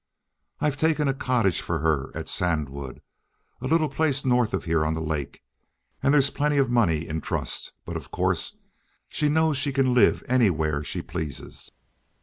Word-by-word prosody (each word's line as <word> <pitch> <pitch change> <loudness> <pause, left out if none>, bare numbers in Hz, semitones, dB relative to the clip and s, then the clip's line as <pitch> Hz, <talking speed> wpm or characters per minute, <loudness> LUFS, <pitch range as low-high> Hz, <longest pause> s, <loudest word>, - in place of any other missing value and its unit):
I've 150 -1 0
taken 155 -1 +2
a 135 - +2
cottage 120 -9 +1
for 85 - -2
her 75 -3 0
at - - -5
Sandwood, 70 -6 -2 0.6
a 130 - -3
little 160 +1 +3
place 145 -3 0
north 125 -3 +3
of - - -2
here 80 -2 +2
on 80 +1 0
the - - -3
lake; 80 -3 -4 0.6
and 140 - +3
there's 140 -1 +4
plenty 150 0 0
of 135 -3 +2
money 85 -10 +2
in 80 0 -3
trust, - - -3
but, - - -6
of - - -6
course, - - -1 0.5
she 150 -1 +1
knows 160 -1 +2
she 140 +1 +1
can 130 -2 +2
live 125 - +4
anywhere 80 - +2
she - - -3
pleases." 80 -5 -6
120 Hz, 170 wpm, -25 LUFS, -, 0.6 s, there's